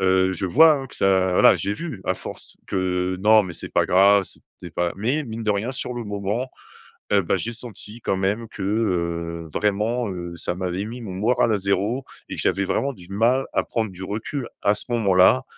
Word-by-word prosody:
heu, 95 0 +3
je 95 +1 -3
vois, 155 - +7
hein, 135 -2 -4
que - - -13
ça 95 -1 +2
voilà - - +6
j’ai 100 - -2
vu 125 - -6
à - - +1
force - - -10
que, 90 -1 -1
non, 110 +2 +6
mais 90 -3 -7
c’est - - -9
pas - - +3
grave, 100 +2 +5
c’était - - -11 0.3
pas 85 0 0
Mais 125 +10 0
mine 115 -2 -6
de 105 - +2
rien 105 +5 -2
sur 125 - -3
le 120 - -4
moment, 105 +5 -3 0.6
heu, 100 -1 +5
bah 85 - +1
j’ai 115 - -3
senti 115 -1 -9
quand 95 - 0
même 100 +5 -1
que, 105 - -10
heu, 85 -5 -1
vraiment, 105 +4 0
heu, 85 -2 -6
ça 85 - -3
m’avait 90 +1 -3
mis 120 +3 -7
mon 100 -5 -6
moral 110 +4 +2
à 105 - +2
0 100 +6 -1 0.2
et - - -4
que - - -3
j’avais 100 - +1
vraiment 135 +8 0
du 90 -4 -15
mal 120 +6 +2
à - - +2
prendre 110 -3 -2
du 95 +1 -9
recul 115 +7 -4
à 100 - +3
ce - - -6
moment-là. 95 - +4
100 Hz, 215 wpm, -23 LUFS, 95-115 Hz, 0.6 s, vois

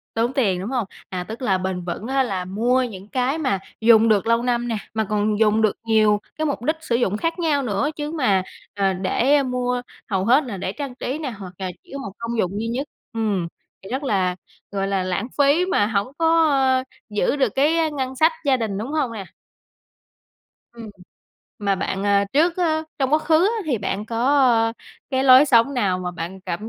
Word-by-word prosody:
Tốn 230 +3 +1
tiền, 195 -10 +1
đúng 205 +6 -5
hông? 245 -5 0 0.2
À, 180 -1 -4
tức 225 +6 -8
là 190 -6 +2
bền 185 -1 -3
vững 185 +5 -5
á 270 +1 +2
là 190 -8 -3
mua 235 +7 +1
những 205 -4 -6
cái 260 +6 0
mà 260 -11 0 0.2
dùng 225 0 +6
được 210 -1 +2
lâu 230 +1 +2
năm 240 -1 0
nè, 225 - -1 0.2
mà 220 - 0
còn 210 0 0
dùng 220 0 +3
được 215 - +2
nhiều 215 -2 +3 0.2
cái 315 - 0
mục 280 -5 -2
đích 310 +5 0
sử 240 -7 0
dụng 210 -4 0
khác 330 +8 -2
nhau 300 -5 +1
nữa 240 +5 -1
chứ 295 0 -4
mà, 210 - +2 0.3
ờ, 195 -1 +1
để, 205 +9 +1
a, 285 - +3
mua 250 -1 -1 0.3
hầu 190 -1 0
hết 260 +6 +4
là 220 -6 -5
để 185 +1 -3
trang 275 0 -6
trí 260 +2 -4
nè 295 -5 -4
hoặc 185 -2 -8
là 185 -1 -3
chỉ - - -22
có 280 - -5
một 200 -8 -6
công 230 0 -4
dụng 200 +2 -1
duy 225 - -2
nhất 255 +5 -2 0.3
ừm, 205 -6 -1 0.3
thì 190 - -11
rất 265 +4 -2
là, 190 -8 0 0.3
gọi 195 -1 -2
là, 195 -2 0
lãng 185 +5 -2
phí 285 +5 +4
mà 205 - +2
hổng 205 +1 -1
có, 325 -1 +4
a, 260 -2 +2 0.3
giữ 210 +6 0
được 265 -7 +1
cái 315 +3 +2
ngân 265 -3 -4
sách 320 +4 +4
gia 270 -2 +3
đình, 215 -5 -3
đúng 235 +7 -5
hông 275 -7 0
nè? 205 -3 -6 1.5
Ừm, 230 -2 -9 0.7
mà 200 -2 0
bạn, 195 0 -3
à, 200 0 +3
trước 330 +5 +3
á 315 -3 +1 0.2
trong 265 +1 0
quá 305 - +6
khứ 315 +1 +1
á 440 - +1
thì 255 -6 0
bạn 200 +1 -3
có, 230 - -5
ơ, 245 -5 +4 0.4
cái 265 -1 +1
lối 260 +2 +8
sống 255 +1 +4
nào 195 -7 +1
mà 180 -1 -3
bạn 175 +2 -7
cảm 185 +4 -5
230 Hz, 220 wpm, -22 LUFS, 200-270 Hz, 1.5 s, lối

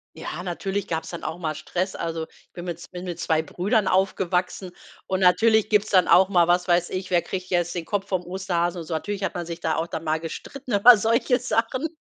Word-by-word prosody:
Ja, 175 - -6
natürlich 190 +2 -3
gab's 160 -1 -3
dann 170 - -7
auch 160 - -4
mal 155 -3 -3
Stress. 180 +5 -3
Also, 165 -1 -3
ich - - -26
bin 175 0 -8
mit 170 -1 -5
z - - -12
bin 180 0 -7
mit 175 -2 -5
2 160 0 +1
Brüdern 195 - 0
aufgewachsen 185 -1 0 0.3
und 185 - -1
natürlich 215 +4 +4
gibt's 210 0 +2
dann 185 -2 +5
auch 190 +1 +6
mal 175 -3 +4
was 175 +1 +2
weiß 175 0 +2
ich, 185 0 -5
wer 175 -1 +4
kriegt 185 -1 -6
jetzt 175 -1 0
den 170 -2 -4
Kopf 200 -1 -2
vom 185 -2 -1
Osterhasen 180 -1 -2
und 160 - -10
so. 165 - -4
Natürlich 200 +4 -4
hat - - -2
man 175 -1 -3
sich 170 0 -6
da 160 -1 -1
auch 160 +2 -1
dann 165 -1 -6
mal 155 0 0
gestritten 250 - -7
über 225 +4 +8
solche 230 +4 +2
Sachen 250 +4 -1
180 Hz, 235 wpm, -24 LUFS, 170-200 Hz, 0.3 s, über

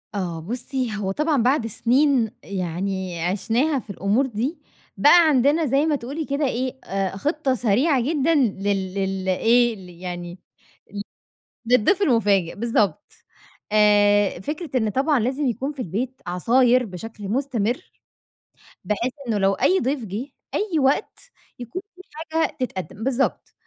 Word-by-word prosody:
آه 175 -4 -3
بُصّي 245 - -3
هو 195 -2 -2
طبعًا 295 0 +1
بعد 250 -2 +2
سنين 245 +1 +2
يعني 185 -1 -3
عِشناها 230 - +1
في 215 - -15
الأمور 200 +6 +1
دي، 255 +7 -3 0.4
بقى 325 - +7
عندنا 290 +3 +3
زي 275 +3 +2
ما 310 - +2
تقولي 285 +5 -5
كده 280 +1 -1
إيه 255 +1 -3
آآ 195 0 -2
خطّة 295 - 0
سريعة 250 +5 +2
جدًا 310 +4 +1
لل 195 -6 0
لل 190 -1 -2
إيه 235 +5 +3
ل 185 -3 -12
يعني 175 0 -7 0.5
ل 200 - -4 0.7
للضيف 250 - +3
المفاجئ 205 - +2
بالضبط 230 +2 0 0.6
آآ 205 -2 +4
فكرة 300 - -5
إن 220 - 0
طبعًا 275 +4 +2
لازم 265 +5 -1
يكون 260 +4 -2
في 270 - -5
البيت 245 +9 -4
عصاير 245 +8 +3
بشكل 205 +2 -8
مستمر، 245 -1 -1 0.9
بحيث 230 +5 -1
إنه 220 -3 0
لو 195 0 +3
أي 380 - +2
ضيف 260 -2 -1
جِه 210 +8 -5 0.3
أي 380 -7 0
وقت 270 +1 +1 0.4
يكون 245 - -6
في 370 - -13 0.2
حاجة 320 0 -2
تتقدم 210 -3 -4
بالضبط. 265 0 -1
235 Hz, 140 wpm, -23 LUFS, 195-275 Hz, 0.9 s, بقى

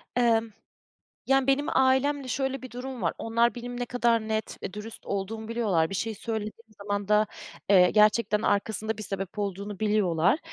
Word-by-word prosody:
Emm. 230 -2 +3 0.8
Yani, 270 0 +3
benim 275 +2 +1
ailemle 265 +1 +2
şöyle 265 +1 -2
bir 255 - -9
durum 250 0 -6
var. 170 - 0
Onlar 230 +2 +1
benim 245 0 -6
ne 245 - -1
kadar 235 -2 +1
net 220 -1 -3
ve 190 - -5
dürüst 215 +2 -9
olduğumu 215 +3 -4
biliyorlar. 205 -9 +1
Bir 195 - -4
şeyi 220 +3 -2
söylediğim 220 +1 -6
zaman 205 0 -2
da, 210 0 +4 0.4
eee, 180 -3 +6
gerçekten 210 0 +3
arkasında 220 +1 0
bir 215 - -6
sebep 195 +1 -5
olduğunu 200 0 -4
biliyorlar. 205 - +2
220 Hz, 165 wpm, -27 LUFS, 205-245 Hz, 0.8 s, eee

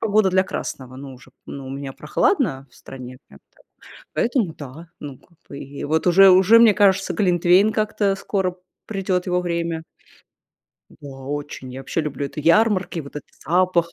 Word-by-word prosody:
погода 215 -2 +2
для 185 0 +3
красного, 130 -7 -6
ну, 135 -1 -9
уже, 130 - -17 0.2
ну, 135 -1 -8
у - - -7
меня 135 -1 -6
прохладно 150 - 0
в - - -25
стране, 130 -1 -10
прям - - -17
так - - -26 0.5
поэтому, 235 - 0
да, 155 +3 -11
ну, 140 -3 -8
как 170 -3 -28
бы 140 - -9
и 140 0 -8
вот 160 +4 0
уже 190 +2 +7
уже 190 +5 +6
мне 225 -3 +6
кажется, 195 -2 +3
глинтвейн 180 +2 +3
как-то, 210 -2 0
скоро 190 -2 -2 0.3
придет 190 -3 -2
его 180 0 +1
время. 170 -2 -3 1.1
Да, 145 - -13
очень. 135 -1 -7
Я 130 - -7
вообще 135 +5 -2
люблю 145 -2 -4
это 140 - -11
ярмарки, 185 +1 +2
вот 140 0 -10
этот - - -9 0.2
запах, 175 -1 +1
170 Hz, 170 wpm, -21 LUFS, 140-195 Hz, 1.1 s, уже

